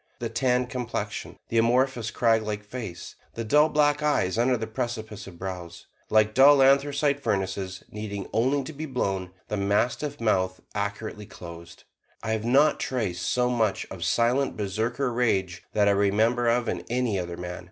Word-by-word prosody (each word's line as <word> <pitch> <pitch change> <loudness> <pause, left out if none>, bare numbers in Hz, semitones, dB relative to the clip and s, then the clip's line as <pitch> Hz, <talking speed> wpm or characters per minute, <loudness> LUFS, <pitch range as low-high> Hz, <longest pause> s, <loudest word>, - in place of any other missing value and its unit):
The 120 -2 -4
tanned 125 +1 +1
complexion; 115 -5 -4
the 115 - +2
amorphous, 120 0 +2
craglike 110 -2 +1
face; 105 -6 -7 0.2
the 115 - -3
dull 150 +7 +4
black 150 -1 +2
eyes 145 -11 +1
under 125 +2 +2
the 110 - -3
precipice 110 -3 -5
of 90 -3 -11
brows, 90 -2 -7 0.2
like 110 0 +3
dull 135 +2 +7
anthracite 140 +1 +3
furnaces 95 -4 -2
needing 100 -2 -5
only 135 +5 +2
to 155 - -8
be 155 +2 -5
blown; 95 -8 -2 0.2
the 105 - -2
mastiff 120 +9 0
mouth 95 -5 +1
accurately 105 0 -4
closed; 85 -1 -11 0.4
I 110 - -2
have 110 0 -1
not 140 +5 +4
traced 105 -9 -2
so 125 0 +2
much 110 -5 0
of 90 -3 -6
silent 120 +8 +1
Berserker 115 +6 -1
rage 95 -7 0
that 105 -1 +3
I - - +5
remember 110 +5 +2
of 120 0 +2
in - - -2
any 120 -5 0
other 85 -1 -5
man. 90 0 -6
110 Hz, 165 wpm, -26 LUFS, 100-125 Hz, 0.4 s, dull